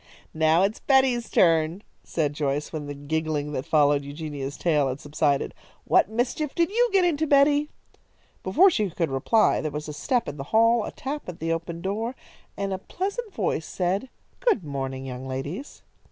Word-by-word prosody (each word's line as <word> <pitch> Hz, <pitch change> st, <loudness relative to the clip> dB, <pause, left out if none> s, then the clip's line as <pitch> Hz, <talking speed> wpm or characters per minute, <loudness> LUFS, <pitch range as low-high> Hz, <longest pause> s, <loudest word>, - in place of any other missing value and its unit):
"Now 160 Hz, +2 st, +3 dB
it 195 Hz, -, +3 dB
is -, -, -14 dB
Betty's 265 Hz, -4 st, +3 dB
turn," 165 Hz, +2 st, +3 dB, 0.2 s
said 150 Hz, -3 st, -1 dB
Joyce, 145 Hz, +1 st, -2 dB
when 150 Hz, -2 st, -4 dB
the 145 Hz, -, -5 dB
giggling 150 Hz, 0 st, -2 dB
that 135 Hz, -2 st, -4 dB
followed 145 Hz, -2 st, +3 dB
Eugenia's 145 Hz, -1 st, -6 dB
tale 150 Hz, -5 st, +2 dB
had 130 Hz, +1 st, -3 dB
subsided. 145 Hz, -1 st, 0 dB, 0.3 s
"What -, -, +4 dB
mischief 245 Hz, +6 st, -2 dB
did 340 Hz, +2 st, +2 dB
you 480 Hz, +3 st, +3 dB
get 385 Hz, -2 st, +4 dB
into, 315 Hz, -2 st, +1 dB
Betty?" 290 Hz, +1 st, +4 dB, 0.7 s
Before 340 Hz, -, +5 dB
she 215 Hz, -, 0 dB
could 165 Hz, -3 st, -2 dB
reply 175 Hz, -, +3 dB
there 155 Hz, -, -2 dB
was 150 Hz, +1 st, -5 dB
a 150 Hz, -, -5 dB
step 245 Hz, -, 0 dB
in 145 Hz, -, -5 dB
the 135 Hz, -, -6 dB
hall, 230 Hz, +4 st, +3 dB
a -, -, -5 dB
tap 285 Hz, -4 st, -5 dB
at 175 Hz, -, -8 dB
the 165 Hz, +1 st, 0 dB
open 165 Hz, 0 st, -5 dB
door, 220 Hz, +7 st, -2 dB, 0.4 s
and 195 Hz, -1 st, -2 dB
a 190 Hz, -, -3 dB
pleasant 400 Hz, -, -4 dB
voice 180 Hz, -, -2 dB
said: 190 Hz, +7 st, -1 dB, 0.3 s
"Good 360 Hz, -, +2 dB
morning, 135 Hz, -2 st, -4 dB
young 130 Hz, 0 st, -6 dB
ladies." 145 Hz, -, -6 dB
165 Hz, 180 wpm, -25 LUFS, 145-245 Hz, 0.7 s, Before